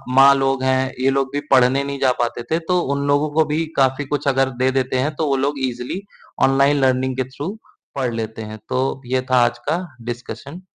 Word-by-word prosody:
माँ 135 +1 +8
लोग 135 -1 0
हैं, 130 0 +1
ये 130 - +3
लोग 135 0 0
भी 145 - 0
पढ़ने 130 +2 +4
नहीं 140 -1 -4
जा 130 - +3
पाते 120 0 -2
थे, 160 - +2
तो 180 +2 0
उन 140 -1 -1
लोगों 145 +2 +2
को 160 0 +3
भी 155 +2 -1
काफ़ी 135 +1 +2
कुछ 145 0 -3
अगर 135 -1 +2
दे 130 - +3
देते 130 -1 0
हैं, 145 +4 0
तो 155 +1 -1
वो 140 - +2
लोग 140 +1 -1
ईज़िली 125 +9 -4 0.5
ऑनलाइन 140 +2 +3
लर्निंग 130 0 +1
के 130 - +1
थ्रू 145 +11 -6 0.4
पढ़ 130 -4 -1
लेते 110 -1 -4
हैं, 110 0 -7
तो 130 +1 -1
ये 130 +1 0
था 125 -1 +5
आज 120 - -1
का 175 +3 0 0.3
डिस्कशन। 125 +7 -8
135 Hz, 220 wpm, -20 LUFS, 130-145 Hz, 0.5 s, माँ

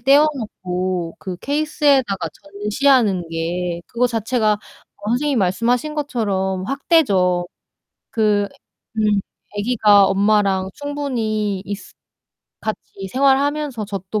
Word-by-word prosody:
떼어 280 +5 +5
놓고 185 -7 -3
그 185 -2 -6
케이스에다가 280 - +1
전시하는 205 -2 +1
게 170 +1 -2
그거 245 +1 +1
자체가 225 -1 +1
어 205 0 -12
선생님이 275 +2 +1
말씀하신 235 +10 +1
것처럼 195 -10 -1
학대죠. 200 - +2 0.6
그 210 -2 +2 0.5
음 215 - +2 0.5
애기가 205 -2 +5
엄마랑 195 -1 +2
충분히 225 -9 -2
있으 200 0 -7 0.7
같이 195 -2 -5
생활하면서 275 -3 +1
젖도 195 +1 -3
215 Hz, 245 characters per minute, -20 LUFS, 190-265 Hz, 0.7 s, 떼어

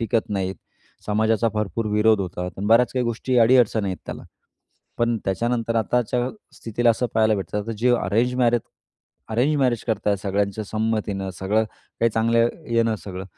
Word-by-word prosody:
टिकत 115 0 0
नाहीत. 95 -2 -1 0.5
समाजाचा 110 +2 +2
भरपूर 105 +1 -2
विरोध 105 0 +4
होतात 90 -1 -4
आणि 100 - -3
बऱ्याच 120 +2 +4
काही 125 -1 0
गोष्टी 120 +2 -1
अडीअडचणी 115 -3 +4
आहेत 95 - -3
त्याला. - - -6 0.8
पण 120 0 +2
त्याच्यानंतर 115 +4 -1
आताच्या 120 +2 0 0.3
स्थितीला 115 +1 +1
असं 125 +2 0
पाहायला 110 -1 +3
भेटतं. 100 +1 -3
आता 115 +3 -5
जे 125 +2 +3
अरेंज 115 +4 0
मॅरेज 120 -2 +3 0.7
अरेंज 125 +7 +2
मॅरेज 125 -3 +1
करत 110 -3 -2
आहेत 100 -2 +2
सगळ्यांच्या 100 +1 -1
संमतीनं, 105 -3 -2
सगळं 105 +5 +1 0.4
काही 115 - +4
चांगलं 115 +1 +2 0.2
येणं 115 -1 +2
सगळं. 95 -1 -6
110 Hz, 155 wpm, -23 LUFS, 105-120 Hz, 0.8 s, विरोध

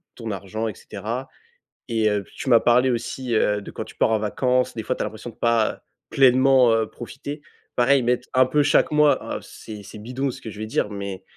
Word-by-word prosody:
ton 115 -2 -5
argent 100 +3 -4
et 105 - -5
cetera 115 +6 -5 0.6
et 110 -2 +2
heu 105 -1 0
puis - - -21
tu 135 - -4
m'as 115 - +7
parlé 125 +2 +4
aussi, 120 +1 -3
heu, 105 -1 +2
de - - -9
quand - - -6
tu - - -14
pars - - +2
en 110 - +2
vacances. 125 +4 0
Des 110 - -4
fois - - -1
tu - - -5
as - - -2
l'impression 110 +2 -7
de - - -25
pas 115 -2 +1 0.3
pleinement, 130 -2 +5
heu, 110 -1 +1
profiter. 140 +5 -8 0.3
Pareil 130 +2 +4
mettre 125 +1 0
un 130 0 +5
peu 150 +3 +2
chaque 145 - +3
mois, 150 -1 +2
heu, - - -7
c'est 105 -2 -10
c'est 105 - -11
bidon 130 +4 -3
ce - - -11
que 110 - -7
je 105 - -10
vais 110 - -3
dire 105 - 0
mais 100 -2 -6
115 Hz, 230 wpm, -23 LUFS, 110-130 Hz, 0.6 s, m'as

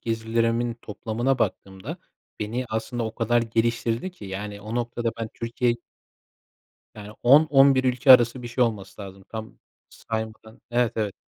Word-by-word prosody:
gezilerimin 115 +1 0
toplamına 115 +4 -2
baktığımda, 100 - -3 0.4
beni 115 +4 -2
aslında 115 +2 -3
o 110 - -5
kadar 120 0 +2
geliştirdi 115 +6 -1
ki, 180 - -13
yani, 100 +1 -6
o 110 +3 -6
noktada 120 -1 -1
ben 110 - -3
Türkiye 120 +1 0 1.2
Yani, 105 0 -10
10-11 135 -1 +6
ülke 130 +1 +2
arası 120 0 +5
bir 120 - -6
şey 120 +1 +2
olması 105 -3 -4
lazım, 95 -1 -11
tam 110 0 -8 0.3
saymadım. 110 0 -6
Evet, 120 -1 +2
evet. 105 -3 -1
115 Hz, 140 wpm, -25 LUFS, 110-120 Hz, 1.2 s, 10-11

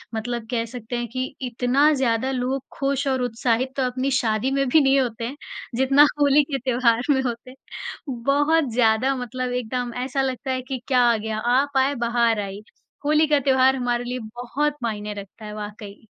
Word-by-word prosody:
मतलब 235 +1 -3
कह 230 -2 0
सकते 240 0 -6
हैं 240 0 -3
कि 255 0 -1 0.2
इतना 250 +5 +3
ज़्यादा 260 -2 0
लोग 260 +1 -2 0.2
ख़ुश 275 0 0
और 260 -1 +1
उत्साहित 245 +1 0
तो 270 - +1
अपनी 255 +2 -1
शादी 220 +3 0
में 275 0 +1
भी 310 +5 +5
नहीं 275 0 +4
होते 235 -3 -2
हैं 265 - -6 0.4
जितना 270 +2 +5 0.2
होली 285 +1 +5
के 275 - +1
त्योहार 240 -2 +2
में 270 -2 +4
होते। 250 +1 -5 0.5
बहुत 280 +4 +1
ज़्यादा 235 +3 +3
मतलब 255 0 -4
एकदम 245 0 -3
ऐसा 270 +1 -1
लगता 265 0 -2
है 255 0 -1
कि 260 0 -5
क्या 255 -3 +3
आ 230 - +1
गया? 215 0 -4
"आप 265 +5 +1
आए, 270 +2 +2
बहार 235 -2 +1
आई" 200 0 -5 0.4
होली 305 +1 +4
का 295 -1 +3
त्योहार 265 -1 +3
हमारे 245 -2 -1
लिए 250 +1 -4 0.2
बहुत 280 +5 -1
मायने 210 -2 -3
रखता 200 +2 -14
है 210 - -7
वाक़ई। 210 0 -8
250 Hz, 185 wpm, -23 LUFS, 235-270 Hz, 0.5 s, भी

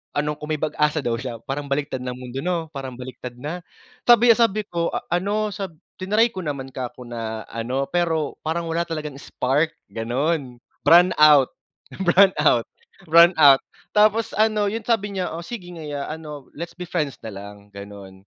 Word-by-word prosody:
ano, 150 +1 0
kung 150 +1 -6
may 155 - -1
pag-asa 150 0 +1
daw 115 -1 0
siya. 120 -1 -6
Parang 140 +1 -3
baliktad 140 -1 -1
na 125 - -3
ang 125 - -12
mundo 125 +1 -6
'no? 170 -2 -1
Parang 135 -2 -6
baliktad 125 -1 -8
na. 155 +8 -5 0.5
Sabi, 240 0 +7
ah, - - -6
sabi 215 -2 +3
ko 170 -1 -1
a - - -3
ano 205 +4 0
sa 195 -1 -4 0.3
triny 210 +5 +3
ko 185 - -5
naman 140 -4 -4
kako 125 -1 -6
na 110 -2 -5
ano, 125 +4 -2
pero 165 -4 0
parang 165 +1 -2
wala 165 +1 0
talagang 155 -3 -5
spark, 145 +5 0 0.2
gano'n. 125 +3 -1 0.3
Brownout, 150 -5 +6 0.5
brownout, 175 -9 +4 0.4
brownout. 160 -4 +7 0.3
Tapos 215 +2 +4
ano, 215 -1 +2
yun 225 +1 -3
sabi 205 -4 0
niya 185 -1 -1
"Oh, 170 - -6
sige 190 -7 -7
nga 160 - -8
ya 145 -1 -4
ano, 150 -3 -8
Let's 170 +1 -6
be 180 0 -6
friends 150 -7 -2
na 110 - -5
lang. 100 +1 -11
gano'n." 100 -1 -11
150 Hz, 175 wpm, -23 LUFS, 130-180 Hz, 0.5 s, Sabi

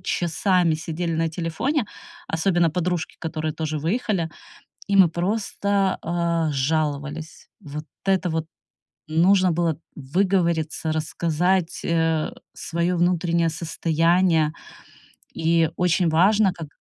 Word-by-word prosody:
часами 175 -1 +1
сидели 165 +2 -3
на 165 0 +1
телефоне, 195 - -1 0.4
особенно 170 0 +2
подружки, 175 +1 -2
которые 155 -1 -3
тоже 155 0 -3
выехали, 180 - -1 0.6
и 200 - +1
мы 185 -3 +7
просто, 200 +2 0
а, 170 -1 0
жаловались. 150 +2 -2
Вот 150 -2 -7 0.2
это 190 -2 +2
вот 160 -1 -1 0.7
Нужно 185 +3 +4
было 165 -2 0 0.2
выговориться, 165 0 0
рассказать, 165 +3 0
э, 165 -2 +1 0.2
свое 170 +2 -1
внутреннее 170 -1 +2
состояние. 165 0 +1 0.8
И 165 0 +2
очень 180 -1 +2
важно, 195 +5 +4
как 165 -4 -8
170 Hz, 105 wpm, -23 LUFS, 160-180 Hz, 0.8 s, мы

